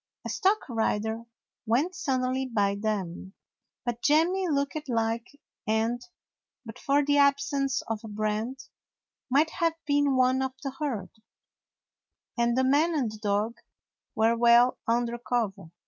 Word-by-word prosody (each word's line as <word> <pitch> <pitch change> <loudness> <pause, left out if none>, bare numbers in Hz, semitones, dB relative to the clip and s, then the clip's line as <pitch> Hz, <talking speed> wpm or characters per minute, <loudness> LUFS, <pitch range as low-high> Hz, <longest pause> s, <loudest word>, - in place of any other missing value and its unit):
A - - -3
stock 400 +3 +1
rider 225 -1 -1 0.4
went 275 +11 +1
suddenly 265 -5 -1
by 205 -5 +1
them, 200 -3 -3 0.5
but 240 -1 -3
J 300 +2 +5
emmy 370 +2 0
looked 280 0 0
like 230 +4 -2 0.3
and, 225 +2 0 0.6
but 225 - -9
for 285 +1 +2
the 290 0 +3
absence 280 -1 +2
of 225 -1 -3
a - - -7
brand, 215 +5 -2 0.7
might 300 +5 +3
have 330 -2 0
been 285 -1 +2
one 255 +1 +3
of 265 -1 -2
the 275 - -3
herd, 260 -9 -4 1.2
and 235 0 +1
the 260 - +3
man 300 +6 +3
and 255 -7 0
the 215 - -10
dog 210 +2 -1 0.6
were 225 +1 +3
well 235 +1 +5
under 235 +1 0
cover. 225 -8 -2
245 Hz, 140 wpm, -27 LUFS, 225-280 Hz, 1.2 s, J